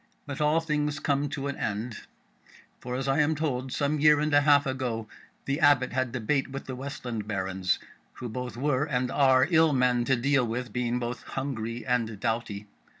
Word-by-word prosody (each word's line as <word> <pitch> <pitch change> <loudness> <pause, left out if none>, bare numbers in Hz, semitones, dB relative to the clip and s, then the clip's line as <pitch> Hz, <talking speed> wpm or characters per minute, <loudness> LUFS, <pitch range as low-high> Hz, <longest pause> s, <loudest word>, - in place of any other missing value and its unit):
But 145 +1 -5
all 150 +2 +3
things 150 -2 -1
come 145 0 0
to 140 0 -4
an 140 - -2
end; 110 +3 -3 0.8
for, 125 0 -5
as 135 +1 -2
I 135 +2 +2
am 155 +1 +3
told, 135 -4 -2
some 145 +2 0
year 150 0 +6
and 150 0 0
a 145 - +6
half 145 0 +5
ago, 125 -4 -2 0.4
the 140 +2 -1
Abbot 145 -5 +4
had 130 -1 0
debate 130 +3 0
with 135 +1 -6
the 130 - -5
Westland 125 -5 -5
Barons, 95 -2 -1 0.4
who 125 - -7
both 125 0 -5
were 140 +1 +1
and 125 -4 -1
are 130 -1 +4
ill 160 -2 +5
men 125 -2 +2
to 130 - +3
deal 135 +2 +2
with, 120 -1 -4
being 125 0 0
both 120 0 -4
hungry 120 -4 -4
and 115 -4 -1
doughty. 110 -2 -2
130 Hz, 190 wpm, -28 LUFS, 120-145 Hz, 0.8 s, year